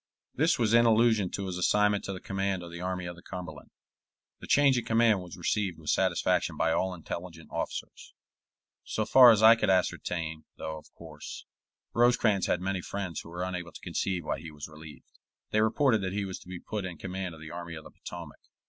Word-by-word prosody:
This 160 +5 +2
was 115 -2 +2
in 120 0 +6
allusion 110 -4 +4
to 100 - -4
his 90 -1 -4
assignment 105 +2 +3
to - - -3
the 95 - -6
command 95 -3 -2
of 85 - -9
the 85 0 -7
Army 90 0 -3
of 85 0 -6
the 85 - -14
Cumberland. 90 0 -8 0.7
The - - -10
change 140 -2 +5
in 120 - 0
command 115 -3 +3
was 90 -1 -10
received 90 0 -1
with - - -2
satisfaction - - +1
by 80 - +2
all 95 +2 0
intelligent 85 -1 -8
officers, - - -5 0.7
so 110 - -2
far 125 +2 +9
as 110 -2 +5
I 115 +1 +10
could 105 -3 0
ascertain, 85 -3 0
though, 80 0 -5
of - - -20
course, - - -9 0.5
Rosecrans 120 -5 +3
had 90 - +1
many 95 0 -1
friends 95 -4 -4
who - - -10
were 90 +2 -4
unable 90 -2 -4
to - - -11
conceive 90 -4 -2
why - - -2
he 80 +1 -8
was 75 -1 -8
relieved. 75 -1 -12 0.5
They 110 - +3
reported 110 +1 +3
that 95 -1 -3
he 100 0 -1
was 95 -1 -6
to - - -17
be 90 -1 -6
put 105 +1 -4
in 90 -3 -6
command 95 -1 -5
of - - -14
the 80 - -8
Army 85 -1 -6
of 80 - -9
the - - -13
Potomac. 85 -4 -9
95 Hz, 210 wpm, -29 LUFS, 85-110 Hz, 0.7 s, I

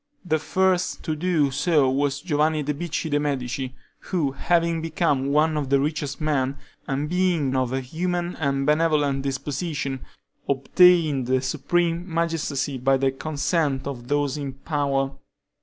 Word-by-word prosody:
The 155 -3 +1
first 185 +2 0
to 155 -3 -2
do 155 -4 +1
so 145 0 +2
was 140 +1 0
Giovanni 155 -1 +1
di 150 +1 -1
Bicci 160 +1 -3
de' 145 - +2
Medici, 130 -2 -2 0.3
who 160 -7 0
having 170 +3 +1
become 160 -4 0
one 155 +2 +2
of 145 -3 -2
the 140 0 +4
richest 145 -1 -2
men, 140 -3 0 0.3
and 140 +2 -1
being 170 -6 +1
of 130 -2 0
a 135 0 -1
humane 175 +6 -2
and 140 -2 0
benevolent 150 -3 +2
disposition, 140 0 -3 0.5
obtained 150 -1 +4
the 130 0 +2
supreme 170 +6 -1
magistracy 155 -5 -1
by 135 +2 +3
the 135 0 +1
consent 145 0 -1
of 125 -4 -6
those 145 0 0
in 140 -2 -4
power. 135 -1 -1
145 Hz, 145 wpm, -24 LUFS, 135-165 Hz, 0.5 s, the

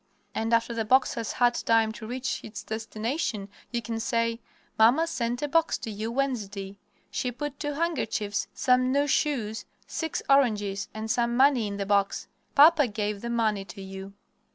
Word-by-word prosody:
And 225 +1 -1
after 230 0 +2
the 230 -1 -1
box 260 +5 +3
has 230 -2 -3
had 245 -1 +3
time 225 -2 +2
to 220 0 -9
reach 255 +2 -3
its 210 -1 -8
destination 220 0 -3 0.2
you 235 -1 -2
can 225 0 -3
say, 230 0 0 0.4
"Mamma 245 +9 +6
sent 245 -5 -2
a - - +1
box 330 +3 +2
to 230 -4 -6
you 215 +2 -4
Wednesday. 205 -7 -3 0.3
She 250 - -1
put 285 +3 -5
two 290 0 -2
handkerchiefs, 220 -11 -1
some 255 0 +2
new 285 +2 +3
shoes, 260 -7 0 0.2
six 320 -1 -3
oranges, 205 -7 +2
and 220 0 -3
some 240 0 +1
money 260 -4 +4
in 200 0 -4
the 200 - -2
box. 200 0 +1 0.3
Papa 300 -1 +7
gave 210 -2 -3
the 235 - -4
money 220 -4 +1
to 185 +1 -11
you." 190 0 -8
230 Hz, 175 wpm, -27 LUFS, 210-260 Hz, 0.4 s, Papa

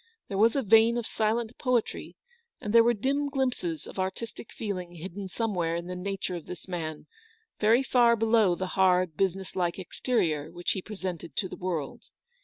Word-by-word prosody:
There 195 - -2
was 225 +4 +5
a 275 - +1
vein 225 +2 +5
of 235 - -2
silent 225 +2 0
poetry, 250 -4 -1 0.4
and 210 - -4
there 230 0 +8
were 240 +1 +3
dim 280 +6 0
glimpses 250 - -1
of - - -8
artistic 215 +5 -4
feeling 180 -5 -5
hidden 190 +4 -6
somewhere 180 -5 -1
in 170 0 -3
the 180 +1 -5
nature 195 0 -3
of 170 - -7
this 180 -1 -8
man, 160 -4 -4 0.5
very 225 +5 +4
far 240 -3 +4
below 220 -4 +3
the 185 +1 -3
hard, 185 -3 +3
business 190 +1 -1
like 175 -2 0
ex 185 -3 -9
it - - -4
a - - +1
2U - - +4 0.3
terior - - -13
which 175 0 -2
he 190 - -2
presented 185 -5 -6
to 190 - 0
the - - -8
world. 170 -6 -4
195 Hz, 200 wpm, -28 LUFS, 180-230 Hz, 0.5 s, there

